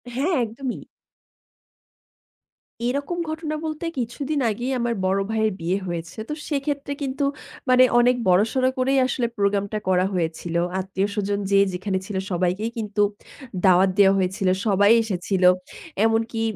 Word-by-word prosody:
হ্যাঁ, 295 +8 0
একদমই। 240 +3 -5 2.1
এরকম 280 +7 -2
ঘটনা 315 -1 -3
বলতে 310 +1 -4
কিছুদিন 275 +5 -2
আগেই 240 +5 -3
আমার 235 0 0
বড় 190 +1 +2
ভাইয়ের 220 -1 +1
বিয়ে 175 +3 0
হয়েছে। 170 0 -5
তো - - -1 0.2
সেক্ষেত্রে 285 -1 -2
কিন্তু 275 +1 -2 0.5
মানে 255 0 +7 0.2
অনেক 245 +1 +4
বড়-সড় 220 +8 +3
করেই 265 +1 +2
আসলে 245 -1 -1
প্রোগ্রামটা 200 +1 0
করা 185 0 +3
হয়েছিল। 170 -1 -2 0.2
আত্মীয়স্বজন 200 +2 -2
যে 200 - +5 0.2
যেখানে 190 +1 -2
ছিল, 205 - -6 0.2
সবাইকেই 185 +5 0
কিন্তু 210 -2 -1 0.6
দাওয়াত 185 +1 +5
দেয়া 195 -1 +6
হয়েছিল। 190 0 0 0.2
সবাই 205 0 +4
এসেছিল। 190 -2 -2 0.6
এমনকি 225 0 0
215 Hz, 125 wpm, -23 LUFS, 190-255 Hz, 2.1 s, মানে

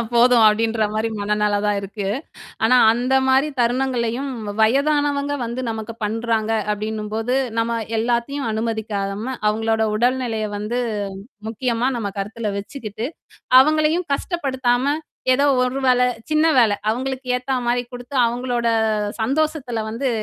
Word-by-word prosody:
அ 235 - -1
போதும்." 240 -1 +6
அப்படின்ற 220 +1 +2
மாரி 220 +1 0
மனநெலை 210 0 +1
தான் 205 -1 +1
இருக்கு. 200 0 -5 0.6
ஆனா 250 +3 +5 0.2
அந்த 250 +3 0
மாரி 265 +3 +3
தருணங்கள்லையும், 245 +1 0 0.3
வயதானவங்க 285 +4 +2
வந்து 235 +2 -4
நமக்கு 220 0 -5
பண்றாங்க 225 0 -1 0.2
அப்படின்னும்போது, 215 +3 -2 0.2
"நம்ம 230 0 0 0.2
எல்லாத்தையும் 240 +3 -1
அனுமதிக்காம, 220 +1 -3
அவங்களோட 220 +1 +1
உடல்நிலைய 240 -3 0
வந்து 220 +4 -2 0.7
முக்கியமா 240 +2 0
நம்ம 205 -3 -3
கருத்துல 210 +1 -3
வச்சுக்கிட்டு, 220 +1 -5 0.6
அவங்களையும் 310 +4 +1
கஷ்டப்படுத்தாம, 270 -4 0 0.4
ஏதோ 280 +3 +3 0.2
ஒரு 255 +2 0
வேல 250 -1 +4 0.3
சின்ன 310 +1 +3
வேலை, 225 -4 +5 0.2
அவங்களுக்கு 260 +2 -3
ஏத்தா 255 +1 -2
மாரி 245 +1 +1
குடுத்து, 245 +2 -9
அவங்களோட 240 0 -1 0.5
சந்தோஷத்தில 265 -1 -1
வந்து 230 +5 -2
235 Hz, 120 wpm, -21 LUFS, 220-260 Hz, 0.7 s, போதும்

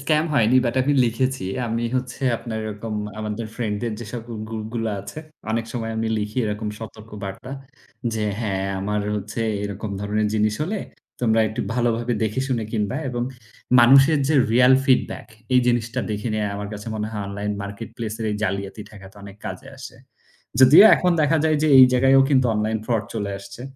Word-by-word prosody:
scam 155 +2 +2
হয়নি 120 +1 +4
but 120 +1 0
আমি 145 +2 +1
লিখেছি। 130 0 -1 0.2
আমি 115 +1 -2
হচ্ছে 125 +1 -5
আপনার 110 -1 -5
এরকম 110 +1 -5 0.2
আমাদের 110 +1 -4
friend-দের 110 -1 -2
যে 120 - -6
সকল 120 0 -7 0.2
groupগুলো 115 +1 -4
আছে 150 - -9 0.3
অনেক 115 0 0
সময় 115 -2 -3
আমি 110 0 -1
লিখি 105 +3 -5
এরকম 105 0 -3
সতর্কবার্তা। 110 0 -8 0.6
যে 110 -1 -1 0.2
হ্যাঁ, 95 -3 -1
আমার 105 +1 -1 0.2
হচ্ছে 105 +3 -5 0.2
এরকম 100 +1 -5
ধরনের 105 +1 0
জিনিস 105 0 +2
হলে 200 +6 -2 0.4
তোমরা 110 -2 +3
একটু 110 - -4
ভালোভাবে 120 0 0
দেখেশুনে 120 +1 -1
কিনবা 110 +3 -1
এবং 120 -1 -2 0.6
মানুষের 135 +5 +6
যে 155 - +2 0.2
real 125 +2 +6
feedback 130 - +1 0.3
এই 125 - +6
জিনিসটা 120 +1 0
দেখে 105 +3 -3
নেয়া 105 -1 -1
আমার 100 0 -5
কাছে 105 +1 -8
মনে 105 0 -2
হয় 105 -2 -4
online 105 +1 -3
marketplace-এর 110 +2 -6
এই 105 - -2
জালিয়াতি 100 +1 -3
ঠেকাতে 100 -2 -14
অনেক 100 0 -11
কাজে - - -7
আসে। - - -10 0.6
যদিও 135 +9 +9
এখন 180 -1 +1
দেখা 155 +2 +3
যায় 155 -1 +3
যে 155 - +3
এইযে 130 -1 +9
জায়গায়ও 135 +1 +5
কিন্তু 130 -3 +4
online 110 +1 0
fraud 115 -3 0
চলে 100 -3 -3
আসছে। 100 +4 -11
110 Hz, 170 wpm, -22 LUFS, 105-125 Hz, 0.6 s, যদিও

